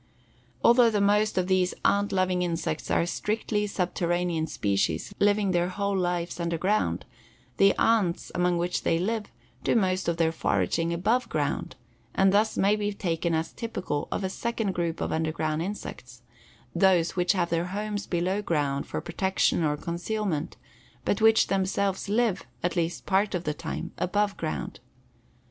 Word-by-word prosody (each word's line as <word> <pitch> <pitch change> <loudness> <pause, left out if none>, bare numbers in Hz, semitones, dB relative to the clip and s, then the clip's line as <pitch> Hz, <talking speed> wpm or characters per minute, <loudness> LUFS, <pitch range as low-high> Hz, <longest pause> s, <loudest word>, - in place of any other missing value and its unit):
Although 240 0 +6
the 210 -2 0
most 205 +1 +2
of 185 - +2
these 185 -1 +1
"ant 200 0 +3
loving" 185 -1 +1
insects 165 -3 -2
are - - +2
strictly 210 +3 -1
subterranean 175 -3 -1
species, 100 - -1
living 205 -1 +3
their 175 0 +1
whole 200 +1 -1
lives 175 -2 -1
underground, 170 +5 0 0.5
the 195 0 +5
ants, 215 -7 +2
among 180 0 +1
which 175 +1 -1
they 165 - +1
live, 210 +5 -1 0.4
do - - +2
most 185 -3 +1
of 170 -1 0
their 165 -1 +2
foraging 160 - 0
above 215 +9 +1
ground, - - -2 0.4
and 190 0 +4
thus 215 +2 +2
may 200 +2 +4
be 205 -1 -1
taken 170 -3 -1
as 160 +1 -2
typical 185 -10 -3
of - - -2
a 190 - -1
second 230 -1 -2
group 170 -2 -2
of - - -1
underground 160 -1 -1
insects 125 -10 -7 0.5
those 175 -1 +3
which 180 +1 +2
have 175 -3 0
their 170 0 +1
homes 205 +2 -4
below 185 +3 0
ground 145 -7 -1
for - - -3
protection 190 -3 +1
or 150 -1 +1
concealment, 170 0 -3 0.5
but - - 0
which 220 0 +6
themselves 195 0 -1
live, 220 -2 +1 0.2
at 175 0 0
least 170 -1 -1
part 195 +1 +1
of 175 - -2
the 150 - -1
time, 160 +2 -5
above 205 +2 +1
ground. 75 -4 -4
185 Hz, 160 wpm, -27 LUFS, 170-205 Hz, 0.5 s, Although